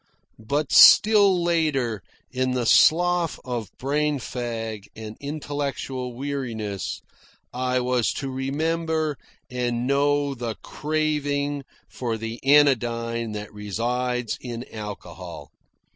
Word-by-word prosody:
But 140 +6 -2
still 200 -4 +7
later, 145 - 0 0.3
in 130 0 0
the 125 -2 -1
slough 175 +5 +4
of 120 -5 -4
brain 150 +2 0
fag 115 -5 -5
and 110 -1 -8
intellectual 140 -3 -4
weariness, 120 -7 -4 0.5
I 125 0 0
was 125 -1 +1
to 135 -1 -4
remember 155 +3 -1 0.4
and 120 -1 -1
know 145 +1 +2
the 120 -3 -4
craving 145 -2 -1 0.2
for 115 -3 -3
the 115 +1 -6
anodyne 115 -5 +3
that 105 0 -6
resides 120 +4 -2
in 120 -1 -6
alcohol. 105 -2 -8
130 Hz, 100 wpm, -24 LUFS, 115-145 Hz, 0.5 s, still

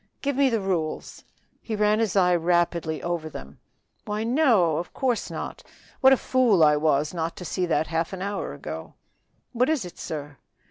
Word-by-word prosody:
"Give 280 -1 0
me 275 0 +4
the 225 -3 0
rules." 175 -5 -3 0.4
He 220 - -4
ran 210 +1 +2
his 225 -4 0
eye 180 -2 +4
rapidly 170 -2 0
over 170 -2 -2
them. 70 - -10 0.5
"Why, 210 +1 -2
no! 230 - +3
of 175 - -5
course 245 -5 0
not, - - -6 0.4
what 265 - +6
a 270 - +6
fool 240 -11 +3
I 150 -1 +6
was 150 0 +1
not 165 -1 -3
to 180 - -8
see 180 +1 -1
that 160 -2 +1
half 165 +1 -2
an 190 -1 -5
hour 200 0 -3
ago." 80 +2 -8 0.6
"What 250 +3 +1
is 310 -10 0
it, 175 - -11
sir?" 145 -2 -6
180 Hz, 185 wpm, -25 LUFS, 160-225 Hz, 0.6 s, what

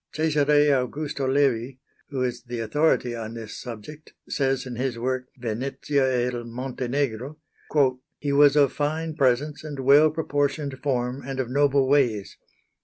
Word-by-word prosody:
Cesare 150 -1 +3
Augusto 140 +1 -1
Levi, 135 -3 +1 0.3
who 135 -3 -2
is 125 -1 -2
the 120 -2 -6
authority 125 0 +1
on 115 0 -6
this 110 -2 -7
subject, 125 +6 -9
says, 135 -2 0
in 125 -2 -6
his 125 0 -2
work 125 +1 -2
"Venezia 130 +4 -1 0.2
e - - +1
il 120 -1 -3
Montenegro": 125 +2 -3 0.8
"He 145 -1 -2
was 145 0 +6
of 145 -3 +4
fine 155 +2 -2
presence 140 +1 +1
and 145 -3 -6
well 145 +4 +6
proportioned 145 -3 -2
form 125 -1 -1
and 135 0 -5
of 125 -2 -2
noble 140 -1 +3
ways. 125 -8 +1
135 Hz, 145 wpm, -25 LUFS, 125-145 Hz, 0.8 s, was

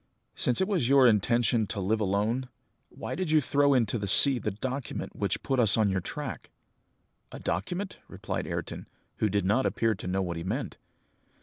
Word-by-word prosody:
Since 125 - 0
it 190 - +1
was 175 - 0
your 135 -1 +5
intention 115 0 +2
to 100 - -5
live 105 +3 -1
alone, 105 +6 -1 0.4
why - - -7
did 185 -3 -3
you 155 0 +4
throw 140 0 +2
into 115 -2 0
the 100 - -4
sea 130 +6 +8
the 110 - -2
document 125 +5 -5
which - - -2
put 135 -1 -1
us 110 -4 +3
on 110 -2 +2
your 95 -1 -1
track?" 140 +6 -7 0.8
"A - - -8
document?" 175 - -4
repeated - - -5
Ayrton, - - -6 0.3
who 110 - 0
did 100 -1 -1
not 110 +7 +2
appear 115 -1 0
to 95 - -8
know 95 +1 -1
what 85 -2 -4
he 85 - -5
meant. 115 +10 -4
115 Hz, 190 wpm, -27 LUFS, 100-135 Hz, 0.8 s, sea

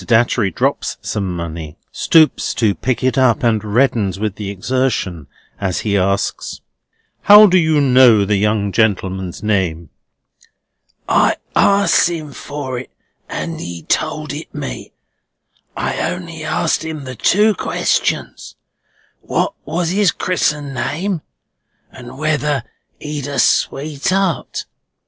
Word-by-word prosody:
Datchery 115 -1 +2
drops 85 - -1
some 95 -3 -3
money, 80 -2 -6
stoops 160 -2 +3
to 110 -4 +2
pick 125 +3 -2
it 130 0 +2
up, 130 -3 +3
and 115 -3 +2
reddens 110 -3 +1
with 105 -2 -1
the 100 0 -6
exertion 100 - -2 0.3
as 95 -3 -1
he 105 -2 -1
asks: 100 +1 -1 0.6
"How 210 +1 +9
do 185 -3 +3
you 160 -2 +2
know 125 -6 +5
the 105 +1 +1
young 105 0 0
gentleman's 95 -4 -1
name?" 90 -7 -1 1.2
"I - - +3 0.2
asked 200 -3 +4
him 155 -4 -5
for 135 -2 -5
it, 125 - -10 0.4
and 165 -1 -4
he 85 -2 -7
told - - -1
it - - -8
me. - - -6 0.9
I - - -2
only - - -6
asked - - 0
him 160 -2 -5
the 130 -1 -7
two 210 - +3
questions, - - -2 0.7
what - - -1
was 165 +3 -1
his 195 -1 +3
Chris'en 150 -6 -1
name, 170 +6 -2 0.7
and 125 -1 -11
whether 150 -3 0 0.4
he'd 150 -2 -5
a 140 - -4
sweetheart? 155 +6 0
125 Hz, 125 wpm, -18 LUFS, 100-155 Hz, 1.2 s, How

